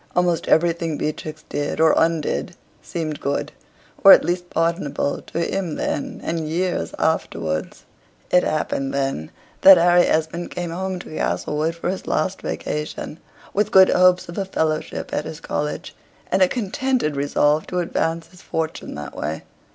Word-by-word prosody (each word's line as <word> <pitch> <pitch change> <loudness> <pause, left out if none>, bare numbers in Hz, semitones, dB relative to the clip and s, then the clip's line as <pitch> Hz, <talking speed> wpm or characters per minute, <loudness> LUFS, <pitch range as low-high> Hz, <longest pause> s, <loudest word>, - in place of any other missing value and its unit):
Almost 175 -2 +1
everything 165 -1 +2
Beatrix 155 0 -4
did 145 0 -3
or 160 -1 +5
undid 165 +1 0 0.3
seemed 155 -3 -4
good, 140 +1 -2 0.5
or 195 - +10
at - - +5
least 175 0 -2
pardonable, 165 -4 -1
to - - -4
him 170 -1 -2
then, - - -3
and 160 -2 -2
years 180 +3 -1
afterwards. 80 - -2 0.5
It 180 - +6
happened, 135 -3 -1
then, 135 - -2 0.3
that 190 -1 +10
Harry 175 +1 +5
Esmond 160 +2 -1
came 175 -2 -4
home 190 +2 -3
to 155 - -10
Castlewood 155 +2 -1
for 170 +1 -2
his 190 - -6
last 185 +5 -1
vacation, 150 +1 -4 0.3
with 210 +1 +1
good 190 -2 +7
hopes 185 0 +4
of 170 +3 -6
a 195 - -1
fellowship 155 -4 -2
at 150 - -1
his 160 0 -7
college, 150 -2 -4 0.4
and 190 - +2
a 185 - +7
contented 240 - -1
resolve 145 +2 +1
to 180 - -4
advance 165 -1 -1
his 180 - -17
fortune 160 0 -4
that 75 -2 -7
way. 80 +1 -4
165 Hz, 155 wpm, -22 LUFS, 150-180 Hz, 0.5 s, or